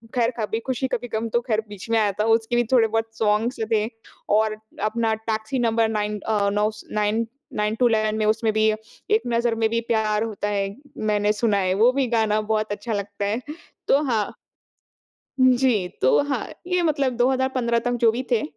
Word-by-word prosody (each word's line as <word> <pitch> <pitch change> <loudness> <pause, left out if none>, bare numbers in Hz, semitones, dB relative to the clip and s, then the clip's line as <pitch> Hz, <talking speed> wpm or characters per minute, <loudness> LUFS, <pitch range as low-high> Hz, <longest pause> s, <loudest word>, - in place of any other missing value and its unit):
खैर, 240 -1 +2
"कभी 220 +1 -1
खुशी-कभी 260 -1 -2
गम" 225 +1 -1
तो 240 +2 +1
खैर 220 -2 +1
बीच 205 +1 -9
में 230 0 +3
आया 210 -2 +2
था। - - +3
उसके 225 +1 -4
भी 240 - +3
थोड़े 230 -3 +5
बहुत 225 +1 -1
सॉन्ग्स 215 +4 +1
जो 220 - 0
थे, 215 -1 +2 0.4
और 215 0 +2 0.3
अपना 225 +1 +1 0.2
टैक्सी 220 +4 -2
नंबर 230 -1 +2
9 210 -1 -2
अ, 205 -1 0
नौ 210 +1 +1
स 215 - -12
नाइन 215 +2 +1 0.3
9 210 +1 0
टू 245 +2 +3
11 215 -1 +1
में, 215 - 0
उसमें 220 +1 +2
भी, 215 0 +3 0.4
"एक 435 - +4
नज़र 235 -1 +1
में 225 0 +2
भी 230 +1 0
प्यार 215 -2 +1
होता 210 -2 -3
है।" 200 -1 -2 0.4
मैंने 210 0 +2
सुना 215 -1 +1
है, 185 -1 +1
वो 230 +5 +5
भी 270 -1 +1
गाना 215 -1 +2
बहुत 215 -1 -1
अच्छा 210 +3 -4
लगता 200 0 -3
है। 215 +5 -1 0.5
तो 280 - +5
हाँ 225 -7 -1 1.1
जी, 250 -7 +3
तो 130 - +5
हाँ, 260 -4 -1 0.2
ये 360 -1 +1
मतलब 285 -5 +1
2015 255 -1 +1
तक - - 0
जो 225 - +7
भी 245 +3 -3
थे, 230 - +3
220 Hz, 195 wpm, -23 LUFS, 210-240 Hz, 1.1 s, जो